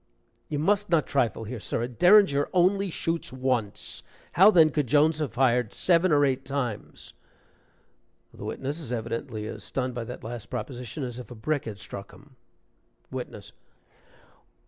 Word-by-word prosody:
You 150 Hz, -, -2 dB
must 205 Hz, +7 st, +1 dB
not 165 Hz, -3 st, +3 dB
trifle 120 Hz, -5 st, 0 dB
here, 115 Hz, +2 st, -6 dB
sir. 115 Hz, -, -2 dB
A -, -, -1 dB
derringer 175 Hz, -, +5 dB
only 190 Hz, +2 st, +3 dB
shoots 165 Hz, 0 st, -3 dB
once 125 Hz, -5 st, -2 dB, 0.3 s
how 190 Hz, +4 st, +7 dB
then 160 Hz, -6 st, +6 dB
could 150 Hz, -4 st, 0 dB
Jones 150 Hz, +4 st, +3 dB
have 150 Hz, -6 st, -2 dB
fired 125 Hz, -3 st, +2 dB
seven 175 Hz, 0 st, +3 dB
or 145 Hz, -1 st, +5 dB
eight 130 Hz, -2 st, 0 dB
times?" 130 Hz, -6 st, -4 dB, 1.2 s
(The -, -, -10 dB
witness 140 Hz, +4 st, -4 dB
is 140 Hz, -7 st, -7 dB
evidently 115 Hz, -1 st, -4 dB
as -, -, -7 dB
stunned 130 Hz, -1 st, -3 dB
by 120 Hz, -1 st, -4 dB
that -, -, -8 dB
last 115 Hz, -3 st, -6 dB
proposition 125 Hz, +2 st, -5 dB
as 125 Hz, -1 st, -5 dB
if 120 Hz, -, -9 dB
a 120 Hz, -, -9 dB
brick 145 Hz, +6 st, -2 dB
had 105 Hz, -3 st, -6 dB
struck 100 Hz, +1 st, -9 dB
him.) 140 Hz, -2 st, -18 dB, 0.8 s
WITNESS. -, -, -7 dB
135 Hz, 160 wpm, -27 LUFS, 120-160 Hz, 1.2 s, how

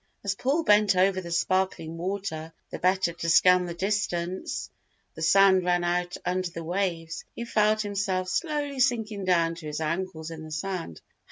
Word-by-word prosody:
As 200 Hz, -1 st, 0 dB
Paul 275 Hz, +10 st, 0 dB
bent 210 Hz, -5 st, +4 dB
over 185 Hz, +1 st, +3 dB
the 170 Hz, -, -8 dB
sparkling 175 Hz, -2 st, 0 dB
water 165 Hz, -3 st, -4 dB, 0.2 s
the -, -, -5 dB
better 185 Hz, -1 st, +2 dB
to 170 Hz, 0 st, -3 dB
scan 180 Hz, +2 st, +5 dB
the 170 Hz, -, -5 dB
distance 185 Hz, -2 st, -2 dB, 0.4 s
the -, -, -10 dB
sand 190 Hz, +3 st, +5 dB
ran 175 Hz, 0 st, +1 dB
out 175 Hz, 0 st, -1 dB
under 180 Hz, 0 st, -1 dB
the 170 Hz, -1 st, -7 dB
waves, 170 Hz, -2 st, -2 dB
he 235 Hz, -, -5 dB
felt 215 Hz, -1 st, +2 dB
himself 195 Hz, -2 st, -1 dB
slowly 290 Hz, -, -2 dB
sinking 225 Hz, -6 st, 0 dB
down 170 Hz, -2 st, +2 dB
to 165 Hz, -2 st, -9 dB
his 150 Hz, 0 st, -4 dB
ankles 160 Hz, 0 st, -3 dB
in 160 Hz, -1 st, -8 dB
the 155 Hz, -, -9 dB
sand. 160 Hz, -, -4 dB
185 Hz, 170 wpm, -27 LUFS, 170-200 Hz, 0.4 s, scan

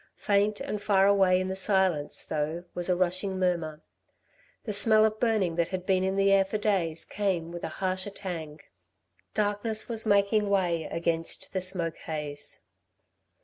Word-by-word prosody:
Faint 205 Hz, +1 st, +1 dB
and 275 Hz, -7 st, -4 dB
far 200 Hz, -2 st, +3 dB
away 190 Hz, -2 st, +4 dB
in 185 Hz, -, -2 dB
the 190 Hz, -, -3 dB
silence 190 Hz, -6 st, +1 dB
though 155 Hz, +3 st, -3 dB
was 175 Hz, +1 st, 0 dB
a 180 Hz, -, +3 dB
rushing 185 Hz, +2 st, -1 dB
murmur. 170 Hz, -4 st, -1 dB, 0.8 s
The 215 Hz, -, -4 dB
smell 215 Hz, +1 st, +5 dB
of 215 Hz, 0 st, -1 dB
burning 210 Hz, -8 st, +1 dB
that 170 Hz, -1 st, +2 dB
had 185 Hz, -1 st, -5 dB
been 185 Hz, -1 st, +2 dB
in 190 Hz, 0 st, 0 dB
the 195 Hz, 0 st, +3 dB
air 195 Hz, 0 st, +5 dB
for 195 Hz, +3 st, -3 dB
days 185 Hz, -6 st, 0 dB
came 185 Hz, -5 st, -2 dB
with 175 Hz, 0 st, -8 dB
a -, -, -1 dB
harsher 185 Hz, +1 st, -2 dB
tang. 165 Hz, -7 st, -6 dB, 0.7 s
Darkness 210 Hz, +1 st, 0 dB
was 225 Hz, -2 st, 0 dB
making 205 Hz, 0 st, +2 dB
way 175 Hz, -5 st, +1 dB
against 165 Hz, -1 st, -2 dB
the 190 Hz, -, -1 dB
smoke 180 Hz, -3 st, +1 dB
haze. 150 Hz, -2 st, -4 dB
190 Hz, 165 wpm, -28 LUFS, 170-205 Hz, 0.8 s, smell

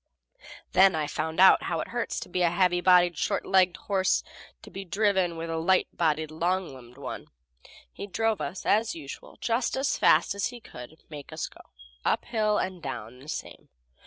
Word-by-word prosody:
Then 190 Hz, -1 st, +5 dB
I 155 Hz, -1 st, 0 dB
found 160 Hz, +2 st, -3 dB
out 190 Hz, -, +7 dB
how -, -, -2 dB
it -, -, -4 dB
hurts 240 Hz, 0 st, -3 dB
a 180 Hz, -1 st, +1 dB
heavy 175 Hz, 0 st, +2 dB
bodied, 175 Hz, -3 st, +4 dB
short 200 Hz, -, -1 dB
legged 185 Hz, -2 st, +3 dB
horse 190 Hz, -2 st, +1 dB, 0.4 s
to -, -, -12 dB
be 195 Hz, -, -6 dB
driven 190 Hz, -2 st, +1 dB
with 165 Hz, 0 st, -4 dB
a 165 Hz, -, -2 dB
light 185 Hz, +3 st, +2 dB
bodied, 155 Hz, -2 st, 0 dB
long 175 Hz, +1 st, -1 dB
limbed 125 Hz, -1 st, -14 dB
one. 140 Hz, -, -7 dB, 0.7 s
He -, -, -7 dB
drove, 225 Hz, +1 st, 0 dB
as 215 Hz, +4 st, 0 dB
usual, 145 Hz, -4 st, -10 dB
just 235 Hz, +2 st, 0 dB
as 270 Hz, +1 st, 0 dB
fast -, -, +4 dB
as 200 Hz, -, -1 dB
he 245 Hz, -1 st, -9 dB
could 150 Hz, -, -12 dB
make 145 Hz, -2 st, -9 dB
us -, -, -3 dB
go, -, -, -12 dB, 0.4 s
uphill 215 Hz, -3 st, +1 dB
and 185 Hz, -2 st, -3 dB
down 125 Hz, -4 st, -7 dB
the 140 Hz, +3 st, -13 dB
same. -, -, -7 dB
180 Hz, 175 wpm, -27 LUFS, 160-200 Hz, 0.7 s, out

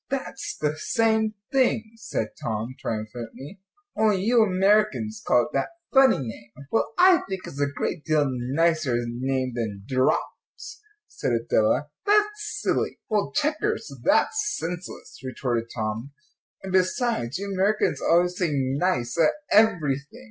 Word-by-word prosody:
"That's 270 Hz, -1 st, -4 dB
the 150 Hz, 0 st, -1 dB
same 220 Hz, 0 st, +1 dB, 0.2 s
thing," 240 Hz, -5 st, +1 dB
said 165 Hz, -, -3 dB
Tom, 110 Hz, +2 st, -3 dB
triumphantly, 115 Hz, -, -6 dB, 0.3 s
"only 210 Hz, -3 st, +2 dB
you 235 Hz, +2 st, +4 dB
Americans 215 Hz, +2 st, +2 dB
call 120 Hz, -, +4 dB
it -, -, -6 dB
that 135 Hz, -, -1 dB, 0.2 s
funny 270 Hz, -1 st, +6 dB
name." 115 Hz, -2 st, -7 dB, 0.2 s
"Well, 225 Hz, -, +1 dB
I 365 Hz, -1 st, +6 dB
think 190 Hz, -1 st, -4 dB
it's 140 Hz, -, -6 dB
a 145 Hz, -, +3 dB
great 145 Hz, +2 st, -3 dB
deal 155 Hz, -2 st, +2 dB
nicer 135 Hz, +3 st, +1 dB
name 130 Hz, +2 st, -2 dB
than 110 Hz, -5 st, -4 dB
draughts," 130 Hz, -, -2 dB, 0.3 s
said 125 Hz, -, -2 dB
Adela; 115 Hz, +5 st, +1 dB, 0.2 s
"that's 420 Hz, +1 st, +4 dB, 0.3 s
silly." -, -, 0 dB
"Well, 210 Hz, -2 st, 0 dB
checkers; 310 Hz, +10 st, -1 dB
that's 430 Hz, -1 st, +2 dB
senseless," 175 Hz, +2 st, -6 dB
retorted 120 Hz, -3 st, -2 dB
Tom, 110 Hz, +4 st, -3 dB, 0.5 s
"and, 190 Hz, -1 st, -5 dB
besides, 185 Hz, -, +1 dB
you 200 Hz, +1 st, -4 dB
Americans 200 Hz, +3 st, +1 dB
always 175 Hz, +1 st, +3 dB
say 180 Hz, -2 st, 0 dB
'nice' 135 Hz, -1 st, 0 dB
at 160 Hz, -, +5 dB, 0.2 s
everything." 155 Hz, -11 st, +2 dB
170 Hz, 135 wpm, -25 LUFS, -, 0.5 s, funny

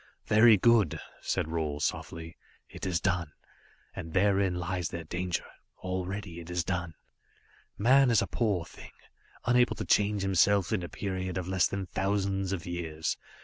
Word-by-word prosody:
"Very 110 Hz, 0 st, +6 dB
good," 110 Hz, -5 st, +3 dB, 0.2 s
said -, -, -1 dB
Roal 75 Hz, -3 st, -2 dB
softly. 80 Hz, +2 st, -3 dB, 0.3 s
"It -, -, -6 dB
is 90 Hz, -2 st, +1 dB
done, 85 Hz, -5 st, -1 dB, 0.6 s
and 80 Hz, -1 st, -7 dB
therein 95 Hz, -1 st, +2 dB
lies 90 Hz, 0 st, -2 dB
their 85 Hz, -2 st, -5 dB
danger. 90 Hz, +2 st, -3 dB, 0.4 s
Already 95 Hz, 0 st, -4 dB
it 85 Hz, 0 st, -10 dB
is 90 Hz, -1 st, -1 dB
done. 90 Hz, -3 st, -3 dB, 0.8 s
"Man 130 Hz, +5 st, +5 dB
is 115 Hz, -, +4 dB
a -, -, -1 dB
poor 100 Hz, -8 st, 0 dB
thing, -, -, -13 dB, 0.5 s
unable 125 Hz, +1 st, +3 dB
to -, -, -4 dB
change 105 Hz, -1 st, +2 dB
himself 95 Hz, +2 st, +3 dB
in 100 Hz, -, +1 dB
a 85 Hz, -, -6 dB
period 95 Hz, -2 st, -3 dB
of 90 Hz, -1 st, -3 dB
less 95 Hz, -1 st, +2 dB
than 100 Hz, -1 st, -4 dB
thousands 95 Hz, 0 st, -1 dB
of 95 Hz, -2 st, -3 dB
years. 80 Hz, -3 st, -3 dB
95 Hz, 155 wpm, -29 LUFS, 85-100 Hz, 0.8 s, Very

